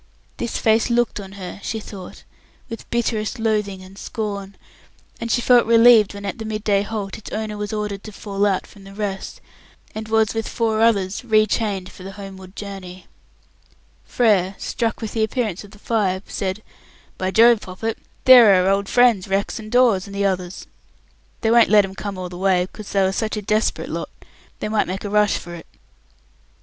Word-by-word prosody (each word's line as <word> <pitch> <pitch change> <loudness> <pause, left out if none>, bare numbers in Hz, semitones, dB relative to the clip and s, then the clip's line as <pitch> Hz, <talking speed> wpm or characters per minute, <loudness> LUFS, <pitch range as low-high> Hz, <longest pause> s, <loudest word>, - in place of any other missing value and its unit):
This 235 - -3
face 225 +1 +2
looked 240 -2 +1
on 195 -1 -9
her 195 0 -8
she 220 - -3
thought 195 -4 -10 0.5
with 230 - -8
bitterest 230 0 -1
loathing 210 -4 -1
and 190 +1 -13
scorn, 200 -3 -5 0.6
and 230 - -4
she 240 - +2
felt 240 -1 +5
relieved 230 -3 +6
when 200 0 -7
at 200 +4 -4
the - - -4
midday 215 -2 0
halt 205 -2 -5
its 220 - -10
owner 215 0 -4
was 210 -1 -4
ordered 210 -2 -4
to 215 - -8
fall 200 0 -1
out 195 -2 0
from 200 - -16
the 195 0 -12
rest, 200 -2 -5 0.5
and 220 0 -6
was 220 -1 +2
with 225 -1 -3
four 225 -2 0
others 205 -3 +2
re 215 -3 +4
chained 205 -3 -2
for - - -14
the 195 +1 -8
homeward 190 -1 -10
journey. 190 -3 -8 1.0
Frere, 200 -5 +2
struck 230 -1 -2
with 220 - -4
the 220 - +1
appearance 220 -4 -2
of 205 - -13
the 210 - -16
five, 205 -4 -1
said, 195 +2 -4 0.6
"By 185 - 0
Jove, 230 +2 +5
Poppet, 215 +5 -5 0.3
there 240 -6 +9
are 180 - +1
our 190 - +3
old 195 0 -1
friends 245 -6 +4
Rex 195 +2 -1
and 215 0 -9
Dawes, 235 -6 +3
and 200 - -9
the 200 0 0
others. 185 -2 -2 0.8
They 225 - +2
won't 235 0 +6
let 205 -1 +6
'em 190 - -9
come 200 0 -6
all 185 -1 -4
the 175 0 -9
way, 185 -2 +2
because 210 +2 -11
they 200 - +2
are 190 0 +2
such 215 +2 -2
a - - -2
desperate 215 +2 0
lot, - - -4 0.5
they - - -1
might 215 0 +1
make 190 +1 -4
a 205 - -5
rush 210 -1 +3
for 175 - -9
it." 170 - -10
210 Hz, 195 wpm, -21 LUFS, 195-220 Hz, 1.0 s, there